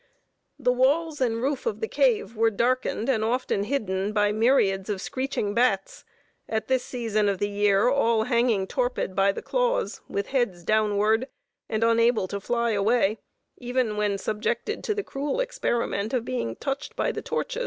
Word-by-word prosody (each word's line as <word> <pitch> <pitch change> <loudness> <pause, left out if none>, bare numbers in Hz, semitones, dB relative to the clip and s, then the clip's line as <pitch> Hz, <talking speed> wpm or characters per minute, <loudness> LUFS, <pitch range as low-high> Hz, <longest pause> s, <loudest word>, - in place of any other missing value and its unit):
The 255 -4 +2
walls 290 +4 +1
and 230 -2 0
roof 280 - -1
of 460 - -2
the 445 - -2
cave 440 - +1
were 225 +1 +3
darkened 235 +1 0
and 235 -5 +1
often 230 -3 0
hidden 205 -6 -1
by 205 -1 +2
myriads 210 -4 +2
of 200 -2 -1
screeching 260 -2 -2
bats, 215 -4 0 0.5
at 220 -1 -2
this 260 -1 +1
season 215 -4 0
of 195 - -1
the 205 - 0
year 205 +1 +2
all 230 -4 +3
hanging 235 -5 +2
torpid 245 -5 -2
by 195 0 +4
the - - -7
claws, - - 0
with 200 0 -3
heads 240 -10 0
downward, 215 +3 +2 0.4
and 220 +1 0
unable 230 -3 +3
to 200 - -3
fly 235 +3 0
away, 215 0 +2 0.4
even 245 -3 -1
when 210 -1 0
subjected 220 - -2
to 425 - 0
the 410 - -2
cruel 285 - -3
experiment 240 - -1
of 235 -2 -1
being 230 - -3
touched 275 +2 -4
by - - 0
the - - -5
torches. - - -3
230 Hz, 170 wpm, -26 LUFS, 205-260 Hz, 0.5 s, by